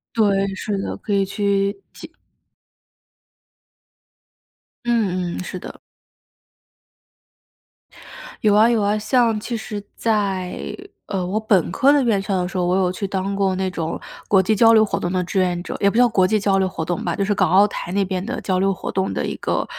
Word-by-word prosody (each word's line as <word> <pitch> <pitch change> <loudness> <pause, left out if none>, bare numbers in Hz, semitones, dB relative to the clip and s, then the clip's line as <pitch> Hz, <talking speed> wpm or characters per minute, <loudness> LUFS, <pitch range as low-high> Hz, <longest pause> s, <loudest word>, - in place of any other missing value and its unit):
对， 195 -3 +2
是 205 0 -3
的， 195 - -4
可 - - -7
以 200 -1 +2
去 200 0 -1
体 - - -12 2.7
嗯 185 -7 0
嗯， - - -4
是 185 - -6
的。 - - -9 2.7
有 210 - +4
啊 215 +3 +5
有 230 -3 +2
啊， 205 +1 +1
像 230 -1 +2
其 235 +3 -4
实 210 -2 -5
在， 200 -5 -1 0.5
呃， 185 -2 -3
我 195 +4 -1
本 200 -6 +1
科 275 +9 +4
的 285 - +3
院 220 -5 +1
校 195 -1 -1
的 - - -1
时 180 +1 -5
候， 180 - +1
我 180 - +2
有 185 -1 +2
去 195 +2 -4
当 190 0 -2
过 195 -1 +1
那 190 0 -2
种 165 -2 -3 0.3
国 195 -2 +4
际 215 - +2
交 225 +2 +5
流 220 -1 +6
活 215 - -1
动 175 - -2
的 180 0 0
志 185 +2 -2
愿 175 -1 0
者， - - -6
也 200 - +3
不 200 - -6
叫 245 +1 +5
国 190 -4 +3
际 215 +2 +2
交 200 -1 +1
流 190 - +2
活 165 -3 -4
动 175 +1 -3
吧， 170 -2 -1
就 200 - -1
是 205 +1 +1
港 185 -4 +1
澳 195 +3 +6
台 175 -2 -6
那 200 - +2
边 185 -1 -3
的 250 +4 -4
交 185 -2 0
流 195 +1 +2
活 - - -6
动 190 0 -1
的 - - -2
一 - - -3
个， - - -1
195 Hz, 215 characters per minute, -21 LUFS, 185-215 Hz, 2.7 s, 流